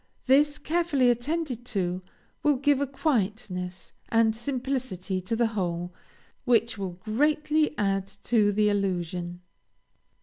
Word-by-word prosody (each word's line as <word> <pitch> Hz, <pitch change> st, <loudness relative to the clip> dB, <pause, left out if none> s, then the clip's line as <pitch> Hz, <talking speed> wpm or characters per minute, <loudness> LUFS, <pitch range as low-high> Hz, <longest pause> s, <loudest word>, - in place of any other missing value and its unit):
This, 290 Hz, +3 st, +4 dB
carefully 300 Hz, -6 st, +2 dB
attended 255 Hz, 0 st, -2 dB
to, 180 Hz, 0 st, -1 dB, 0.4 s
will 295 Hz, -1 st, +3 dB
give 280 Hz, +1 st, +2 dB
a 285 Hz, -, +1 dB
quietness 210 Hz, -, -2 dB, 0.2 s
and 225 Hz, -1 st, +3 dB
simplicity 240 Hz, -7 st, -3 dB
to 185 Hz, +5 st, -2 dB
the 235 Hz, +1 st, +2 dB
whole, 175 Hz, -3 st, -2 dB, 0.5 s
which 235 Hz, -1 st, +3 dB
will 195 Hz, -4 st, -4 dB
greatly 300 Hz, -, +1 dB
add 195 Hz, -1 st, 0 dB, 0.2 s
to 215 Hz, -3 st, +3 dB
the 210 Hz, +1 st, +2 dB
illusion." 180 Hz, -3 st, -1 dB
225 Hz, 115 wpm, -27 LUFS, 190-275 Hz, 0.5 s, This